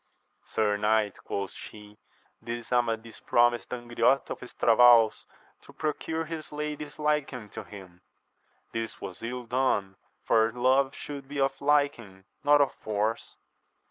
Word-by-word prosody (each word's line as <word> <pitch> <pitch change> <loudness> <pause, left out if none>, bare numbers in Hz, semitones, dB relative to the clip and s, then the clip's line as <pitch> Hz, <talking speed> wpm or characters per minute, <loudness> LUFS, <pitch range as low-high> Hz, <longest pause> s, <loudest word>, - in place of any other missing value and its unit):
Sir 105 -2 +1
knight, 105 -1 +1
quoth 100 -1 -3
she, 105 0 -12 0.4
this 120 0 -6
Amadis 115 -2 -1
promised 120 0 +2
Angriote 120 +2 +1
of - - -4
Estravaus 120 -2 +4 0.3
to - - -16
procure 160 +1 -2
his 160 -1 -7
lady's 150 0 -5
liking 150 -7 -1
to - - -7
him: 95 -4 -13 0.7
this 115 -1 -4
was 95 -4 -8
ill 125 +2 -4
done, 115 -6 0 0.3
for 110 0 +3
love 130 +3 +2
should 140 -2 -8
be 140 0 -5
of 135 0 0
liking, 140 -10 +1 0.2
not 145 0 +5
of 140 - +2
force. 110 +2 -3
120 Hz, 130 wpm, -28 LUFS, 110-140 Hz, 0.7 s, not